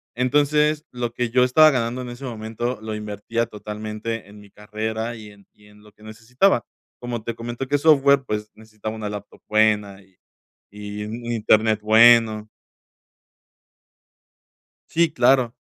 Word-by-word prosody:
entonces, 150 +4 +1
lo 120 -1 -4
que 120 -1 -2
yo 125 +1 +3
estaba 155 +5 +6
ganando 125 -1 -2
en 125 - -7
ese 120 +3 -9
momento 115 +1 -4
lo 110 -1 -5
invertía 105 +2 -3
totalmente 110 0 -6
en 105 - -14
mi 105 - -17
carrera 110 +2 -5
y 110 -2 -11
en 100 -1 -20
y 105 0 -22
en 105 0 -20
lo 105 - -18
que - - -27
necesitaba. 115 - 0 0.3
Como 120 -2 -5
te 115 -1 -5
comento, 120 +3 -6
que 145 - 0
es 145 - 0
software, 140 -3 +4
pues 105 -2 -4
necesitaba 110 0 -8
una 110 -2 -5
laptop 105 -1 -9
buena 105 -2 +1
y 95 -1 -27 0.5
y 105 0 -7
un 115 +3 -7
internet 110 -1 +2
bueno. 110 -1 +5 2.4
Sí, 165 -1 +2
claro. 125 -2 +3
115 Hz, 155 wpm, -22 LUFS, 105-125 Hz, 2.4 s, estaba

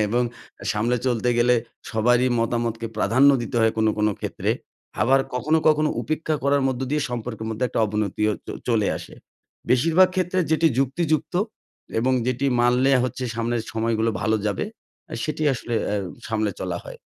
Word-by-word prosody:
এবং 120 +4 +1 0.4
আ - - -7
সামলে 115 +4 +1
চলতে 125 -1 +1
গেলে 125 +1 +4 0.4
সবারই 120 +3 +3
মতামতকে 115 0 -1
প্রাধান্য 130 +7 +5
দিতে 120 - -4
হয় 110 0 +3
কোনো, 110 0 +3
কোনো 105 0 +3
ক্ষেত্রে। - - -2 0.5
আবার 135 +4 +4
কখনো, 150 +6 +2
কখনো 155 0 +3
উপেক্ষা 155 0 -1
করার 140 0 +3
মধ্য 130 -1 -3
দিয়ে 150 0 +1
সম্পর্কের 115 -2 -4
মধ্যে 110 +3 -1
একটা 120 - -1
অবনতিও 105 0 0
চ - - -18 0.2
চলে 110 -4 +2
আসে। - - -11 0.6
বেশিরভাগ 165 +9 +5
ক্ষেত্রে 185 0 0
যেটি 160 +1 +3
যুক্তিযুক্ত 155 +5 0 0.7
এবং 130 +3 +2
যেটি 130 +2 0
মানলে 125 +2 +3
হচ্ছে 130 +1 -3
সামনের 115 0 -1
সময়গুলো 115 0 0
ভালো 110 +1 +2
যাবে, 100 -2 -1 0.5
আ - - -2
সেটি 155 0 -3
আসলে 120 -1 -4 0.2
আ - - +1 0.3
সামলে 110 -2 0
চলা 90 -2 -3
হয়। - - -10
120 Hz, 160 wpm, -23 LUFS, 110-135 Hz, 0.7 s, প্রাধান্য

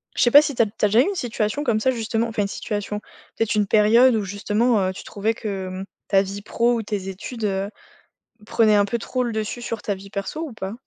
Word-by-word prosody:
je - - 0
sais 240 - +4
pas 290 - +10
si 290 -2 -3
tu 235 - +3
as - - +5
tu 205 - -12
as - - +5
déjà 220 +4 +5
eu - - +5
une 400 +6 -2
situation 240 - -2
comme 215 -4 +1
ça, 260 - +3
justement, 225 -1 -1
enfin, 220 -2 -1
une 200 - -1
situation, 210 0 -4 0.3
peut-être 225 -1 0
une 210 -1 +2
période 225 +4 +5
où 215 - 0
justement, 210 +4 +1
heu, 185 - -2
tu - - -9
trouvais 215 +2 -1
que, 200 -4 -4
mmh, 185 +1 -5 0.2
ta 195 -1 +4
vie 200 +1 -5
pro 235 +3 +1
ou 230 - -1
tes 200 -2 -4
études, 220 +5 -7
heu, 195 -1 -1 0.8
prenait 220 -2 +4
un 205 -1 +4
peu 235 +4 -2
trop 255 +2 -3
le 235 - -2
dessus 220 +2 -3
sur 230 -2 -5
ta 205 - -1
vie 195 0 -10
perso 200 +11 -4
ou 320 -4 -5
pas? 195 -1 -5
215 Hz, 260 wpm, -23 LUFS, 200-235 Hz, 0.8 s, pas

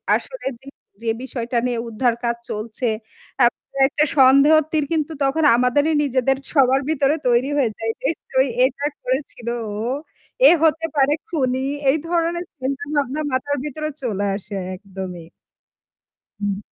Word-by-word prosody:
আসলে - - -6
যে, 265 - -23 0.4
যে, 230 - -6 0.2
বিষয়টা 245 -2 -3
নিয়ে 245 -1 -1
উদ্ধার 235 +2 +1
কাজ 235 0 +1
চলছে। 220 +3 -3 0.5
তারপরও 255 +2 +1
একটা 300 +2 +1
সন্দেহ 275 +3 +7 0.2
তীর 310 -2 +1
কিন্তু 315 -1 0
তখন 275 +4 +1
আমাদেরই 255 +6 +2
নিজেদের 270 -1 +1 0.2
সবার 270 -3 +4
ভেতরে 290 -1 +2
তৈরি 245 +2 +3
হয়ে 265 -5 +3
যায়। 225 0 -1
যেহেতু 275 -2 -3 0.3
এটা 275 +2 -2 0.2
করেছিল 255 -2 -3 0.3
ও। - - -5 0.7
এ - - +8
হতে 320 0 +3
পারে 280 0 +4
খুনি 260 -5 -1 0.2
এই 280 - +4
ধরনের 340 +1 0
চিন্তাভাবনা 280 +1 -2
মাথার 285 +3 -1
ভিতরে 305 +1 -4
চলে 205 -6 -1
আসে 200 +1 -7 0.2
একদমই। 185 -3 -8 1.1
হুম। 205 -1 -1
265 Hz, 135 wpm, -21 LUFS, 240-290 Hz, 1.1 s, এ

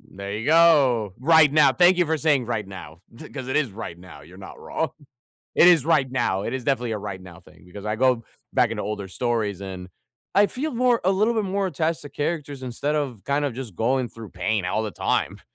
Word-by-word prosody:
There 100 +1 -8
you 110 +5 -4
go. 140 - +4
Right 150 +2 +5
now. 145 -3 +5
Thank 175 +3 +5
you 175 - +3
for 160 0 +1
saying, 145 -5 +1
"Right 110 -4 -2
now." 85 -4 -10 0.2
Th 155 - -12
'cause 130 -2 -6
it - - -1
is 145 -7 +1
right 95 -4 -8
now, 90 -5 -13
you're 90 +5 -15
not 95 - -11
wrong. 160 -2 -3 0.6
It 175 - +6
is 165 -6 +5
right 150 -6 +2
now; 95 -7 0
it - - -4
is 130 -2 -4
definitely 125 -4 0
a 105 - -2
right 100 -2 -6
now 90 -2 -13
thing, - - -20
because 100 +3 -11
I 105 +1 -1
go 125 -2 +2 0.3
back - - +3
into - - -3
older 100 -1 -4
stories, 110 -3 -2
and 95 -2 -7 0.5
I 205 +1 +5
feel 285 +7 -4
more 245 -1 +2
a 190 - +3
little 215 +5 +2
bit 215 -2 0
more 195 +1 -1
attached 160 -1 -2
to 145 - -9
characters 145 -2 -4
instead 130 +4 -3
of 135 -9 -3
kind 145 +1 0
of 135 -5 -2
just 125 -8 -7
going 125 +2 0
through 115 -3 -11
pain 105 -2 -1
all 100 +5 -1
the 110 - -3
time. - - -1
130 Hz, 230 wpm, -24 LUFS, 105-155 Hz, 0.6 s, It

